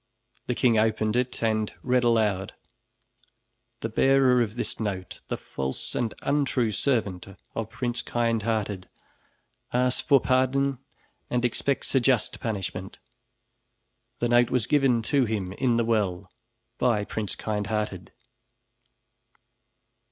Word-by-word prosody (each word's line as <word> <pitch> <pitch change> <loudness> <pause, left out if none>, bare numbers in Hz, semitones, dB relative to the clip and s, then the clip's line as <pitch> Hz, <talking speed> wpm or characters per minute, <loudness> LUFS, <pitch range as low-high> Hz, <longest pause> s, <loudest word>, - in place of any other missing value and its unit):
The 125 - 0
king 115 -4 +3
opened 110 0 +1
it 125 -1 -1
and 110 -1 +1
read 125 -1 +2
aloud: 105 -5 +1 1.3
"The 115 - -2
bearer 130 +1 +4
of 110 -2 -1
this 120 - -2
note, 95 -4 -4
the - - -2
false 65 0 -3
and 120 -5 -1
untrue 140 -5 +1
servant 105 -6 0 0.3
of 115 -1 -4
Prince 120 +1 -2
Kindhearted, 110 -5 -1 0.8
asks 125 +1 +1
for 140 -2 +5
pardon 130 +1 +1 0.5
and 125 0 0
expects 135 +3 -1
a 135 - +5
just 125 -3 +1
punishment. 95 -4 -4 1.2
The 120 - 0
note 120 0 +4
was 125 -5 +1
given 135 -6 +3
to 135 +2 +2
him 105 -5 -2
in 120 +2 +1
the 115 - +2
well 100 -5 0 0.5
by 115 -5 +2
Prince 105 -1 -3
Kindhearted." 105 -3 -3
115 Hz, 120 wpm, -26 LUFS, 105-125 Hz, 1.3 s, for